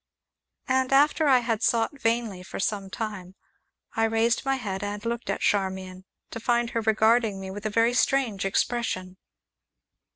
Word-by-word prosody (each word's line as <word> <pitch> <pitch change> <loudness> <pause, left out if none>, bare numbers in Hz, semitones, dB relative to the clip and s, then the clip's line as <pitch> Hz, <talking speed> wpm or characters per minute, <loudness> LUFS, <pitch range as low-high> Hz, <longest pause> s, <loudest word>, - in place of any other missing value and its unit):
And, 260 0 +1
after 295 +3 +4
I 260 -3 +5
had 230 -2 -1
sought 240 +5 +1
vainly 225 -4 0
for 185 - -8
some 195 -1 -2
time, 190 -3 -6 0.6
I 225 - +2
raised 225 +1 +1
my 270 0 +1
head 200 -6 -4
and 205 +1 -5
looked 235 +1 -3
at - - -2
Charmian, 190 -2 -1 0.3
to - - -5
find 235 0 +1
her 230 - -1
regarding 220 -1 +2
me 190 0 -6
with 205 +2 -4
a - - -2
very 230 +3 +2
strange 250 -5 +1
expression. 195 -2 -1
225 Hz, 160 wpm, -26 LUFS, 195-240 Hz, 0.6 s, I